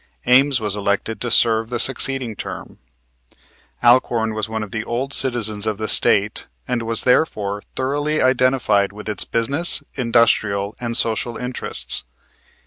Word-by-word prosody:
Ames 130 +1 +4
was 105 -2 -3
elected 100 +2 -2
to 120 - -3
serve 115 -1 +2
the 120 - -3
succeeding 135 -2 +1
term. - - -9 1.0
Alcorn 120 -2 +2
was 110 0 -4
one 110 -1 -4
of 105 - -10
the 110 -1 -4
old 130 +5 -4
citizens 110 -6 0
of 110 -2 -2
the 110 0 -4
State, 105 0 +2 0.2
and 125 -1 -2
was 115 0 +1
therefore 105 -7 0
thoroughly 145 +3 -2
identified 130 -6 +1
with 105 +1 -11
its 105 -3 +4
business, 140 +9 +2
industrial, 110 -4 +1
and 120 -1 -1
social 115 +1 -1
interests. 125 0 -3
115 Hz, 140 wpm, -19 LUFS, 110-130 Hz, 1.0 s, Ames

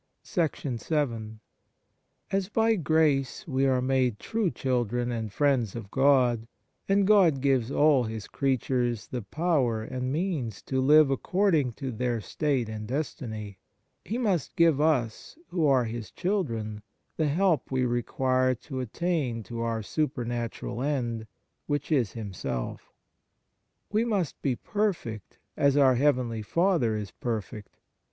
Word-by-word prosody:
vii 125 - -2 0.9
AS 195 0 0
by 225 +1 +3
grace 155 - +1
we 135 -2 +1
are 130 -1 +2
made 130 -4 +1
true 220 - -1
children 120 -3 -1
and 110 -3 -3
friends 130 -6 +1
of 105 -4 -7
God, 130 -4 +3 0.4
and 200 0 +4
God 190 -9 +5
gives 130 -3 +2
all 145 -3 +4
His 110 -1 -5
creatures 125 -4 0
the 125 - -5
power 130 - 0
and 130 +2 -3
means 150 - -2
to 130 -1 -1
live 150 +1 +6
according 160 - +1
to 135 +2 -5
their 120 0 -1
state 135 +2 -1
and 110 -1 -6
destiny, 110 -7 -4 0.4
He 225 - -3
must 200 - 0
give 165 -4 +4
us, 135 - 0
who 165 -4 +1
are 130 -3 +4
His 115 -1 -5
children, 115 - -2 0.3
the 155 - +1
help 165 -1 +1
we 130 -1 +1
require 130 +1 +1
to 130 +3 -7
attain 130 -2 -1
to 115 +2 -6
our 115 -1 -1
super 130 0 -1
natural 120 0 -4
end, 120 -6 -2 0.4
which 145 +1 -2
is 125 -10 +2
Himself. 90 - -5 1.0
We 215 +2 +2
must 200 - -1
be 135 -3 0
perfect 170 - -3 0.2
as 140 0 +3
our 135 -2 +6
heavenly 125 -4 +1
Father 160 - +1
is 105 -3 -5
perfect. 105 -3 -5
130 Hz, 135 wpm, -27 LUFS, 115-155 Hz, 1.0 s, live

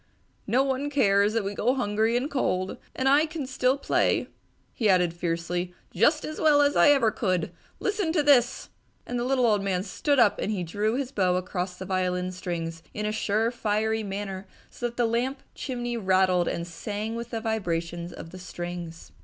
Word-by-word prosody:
"No 255 +3 +3
one 275 +1 -1
cares 205 -7 +3
that 225 -2 +1
we 200 +1 -3
go 245 +6 +1
hungry 220 -1 +1
and 255 +3 -1
cold! 185 -10 -1 0.2
And 260 - 0
I 290 +4 +5
can 310 -3 -5
still 260 0 +1
play," 275 - +1 0.4
he 220 -4 +1
added 180 -3 +3
fiercely, 175 +1 -2 0.2
"just 295 - +3
as 310 - -5
well 300 -2 +5
as 285 0 +2
ever 275 -7 +5
I - - -19
could! 185 -6 0 0.3
Listen 405 -5 0
to 310 -4 +2
this!" 260 -4 +3 0.4
and 245 0 -3
the - - -1
little 255 0 +2
old 210 -3 +3
man 190 -2 -1
stood 280 +8 0
up 225 -5 +4
and 195 -4 -2
drew 210 +6 -1
his 270 -1 -2
bow 185 -7 +2
across 180 0 -3
the 185 - -6
violin 185 -1 -1
strings 165 -2 -4
in 210 - -2
a 210 - 0
sure, 220 +1 0
fiery 220 -1 0
manner, 195 -1 -5 0.2
so 245 - -3
that 235 - -10
the 240 - +3
lamp 245 +4 -1
chimney 240 -3 -4
rattled 185 -3 +3
and 170 - -2
sang 205 +5 -4
with 235 0 -5
the 230 - -3
vibrations 175 -6 -2
of 165 - -10
the 185 - -9
strings. 175 -2 -7
215 Hz, 190 wpm, -26 LUFS, 185-250 Hz, 0.4 s, I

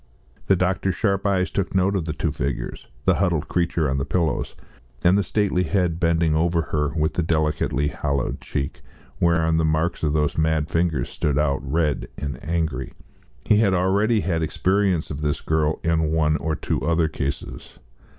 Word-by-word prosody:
The 95 - +5
doctor's 95 +1 0
sharp 100 0 0
eyes 95 -2 +1
took 95 -1 -2
note 95 +2 +2
of 90 -5 -1
the 80 - -2
two 80 0 -1
figures, 70 - -4 0.2
the - - +4
huddled - - +1
creature 85 -3 0
on 65 0 0
the - - -1
pillows 80 +3 -1 0.5
and 90 +2 +5
the 100 - +3
stately 95 -1 +1
head 90 -2 0
bending 85 -2 +2
over 85 +1 +2
her, 75 -1 +2
with 80 -1 +1
the - - 0
delicately 75 -3 0
hollowed 70 -4 -2
cheek, 70 -1 -4 0.4
whereon 80 -1 +2
the 80 - +2
marks 80 +2 0
of 75 -2 +1
those 75 0 0
mad 80 -1 +1
fingers 80 -6 0
stood 75 -2 -1
out 70 -2 +1
red 75 +1 -1
and 70 -1 -5
angry. 80 -6 -2 0.5
He 105 - +4
had 100 -3 +3
already 100 +5 +2
had 85 -4 -1
experience 95 +1 +1
of 75 0 -5
this 75 -1 0
girl 80 -1 0
in 80 -1 +1
one 80 -1 +2
or 80 +2 -2
two - - -2
other 80 0 +2
cases. 70 -2 -5
80 Hz, 180 wpm, -23 LUFS, 75-90 Hz, 0.5 s, The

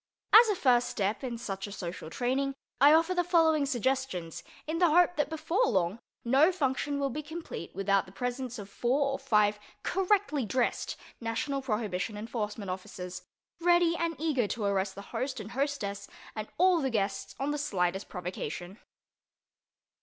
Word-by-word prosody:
As 450 +1 +9
a 415 - +2
first 250 -7 +3
step 205 +4 -1
in 240 -3 -3
such 195 -3 -5
a - - -9
social 175 -4 -6
training 265 +7 -1 0.2
I 285 +3 +8
offer 325 +3 +4
the 355 -1 +2
following 320 -4 +3
suggestions, 255 - -1 0.2
in 320 +2 -2
the 350 -2 +5
hope 355 +2 +4
that 295 -2 0
before 330 +9 +1
long 185 +4 +1 0.3
no 275 +8 +5
function 285 -3 -1
will 275 -1 0
be 300 - -3
complete 320 - -7
without 195 0 +1
the - - -13
presence 245 +3 -4
of 205 -2 -7
four 265 +7 +1
or 270 - -3
five 210 -5 +2 0.2
correctly 380 -7 +1
dressed 240 +3 -1 0.2
National 275 +5 -2
Prohibition 215 -4 -2
Enforcement 210 -2 -4
Officers, 180 0 -6 0.4
ready 345 0 +4
and 335 -1 -1
eager 285 -8 +1
to 220 +1 -3
arrest 195 -1 0
the 200 - -8
host 260 -1 -2
and 215 +1 -7
hostess 225 -8 -2 0.3
and 215 -1 -4
all 360 -1 +4
the 265 - 0
guests 200 -4 -2
on 275 +2 0
the 295 - -2
slightest 190 -8 -1
provocation. 180 +1 -5
255 Hz, 165 wpm, -30 LUFS, 200-305 Hz, 0.4 s, As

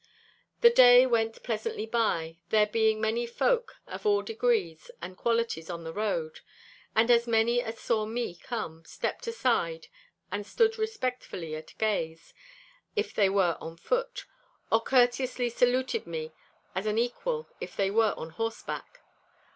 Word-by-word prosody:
The 470 0 +7
way 245 0 +9
went 225 -3 0
pleasantly 220 -1 -3
by, 170 -8 -1
there 215 -1 +4
being 220 0 +2
many 225 +2 0
folk 480 - 0
of - - -8
all 415 -1 +3
degrees 465 +1 -1
and 185 - -7
qualities 230 -8 -1
on 170 -1 -5
the 160 0 -6
road. 170 -7 -2 0.6
And 230 +2 +4
as 235 0 +4
many 230 +1 +3
as 225 -1 -6
saw 215 -2 0
me 230 -3 -3
come, 175 -4 -6
stepped 165 - -4
aside 230 - 0 0.4
and 205 0 -2
stood 450 - +1
respectfully 255 - -3
at 155 - -10
gaze, 165 -7 -2 0.6
if 425 0 -1
they 200 -2 +3
were 190 -4 +2
on 165 +1 -8
foot; - - -2 0.5
or 225 - +4
courteously 245 0 +2
saluted 250 0 +1
me 160 -1 -5 0.4
as 190 +3 -2
an 210 +1 0
equal 465 - -1
if - - -7
they 195 -1 +1
were 220 0 +3
on 160 - -7
horseback. 225 - -5
225 Hz, 145 wpm, -28 LUFS, 195-250 Hz, 0.6 s, way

